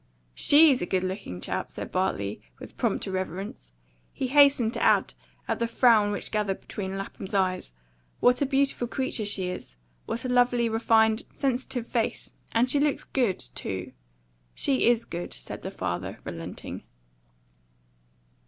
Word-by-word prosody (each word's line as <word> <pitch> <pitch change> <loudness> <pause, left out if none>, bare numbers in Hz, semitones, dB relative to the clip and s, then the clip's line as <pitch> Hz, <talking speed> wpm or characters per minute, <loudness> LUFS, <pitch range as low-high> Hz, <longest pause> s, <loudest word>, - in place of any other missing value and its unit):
"SHE'S 290 - +6
a 175 - -2
good 185 -1 0
looking 185 - -4
chap," - - -3
said - - -7
Bartley, 105 - -1 0.2
with - - -11
prompt - - 0
irreverence. 185 - -5 0.4
He 260 - -3
hastened 275 -5 +5
to - - -4
add, - - +3 0.3
at - - -1
the 235 - +1
frown 230 -3 +4
which 205 - -3
gathered 210 -3 -1
between 195 -1 -5
Lapham's 195 0 -6
eyes, 185 - 0 0.5
"What 250 +2 +4
a 280 - +2
beautiful 275 -3 +1
creature 245 -4 -2
she 190 -3 0
is! 120 - -7 0.3
What 235 - -2
a - - -1
lovely, 245 -1 +3
refined, 220 0 +3
sensitive 255 -3 -1
face! 235 -2 -2 0.2
And 230 +2 +3
she 280 +3 +2
looks 290 0 +1
GOOD, 240 -8 0 0.2
too." 95 -1 -4 0.6
"She 270 -4 +2
is 235 -1 +3
good," 175 +1 -5
said - - -7
the - - -5
father, - - -4
relenting. 85 +1 -7
220 Hz, 150 wpm, -27 LUFS, 185-250 Hz, 0.6 s, SHE'S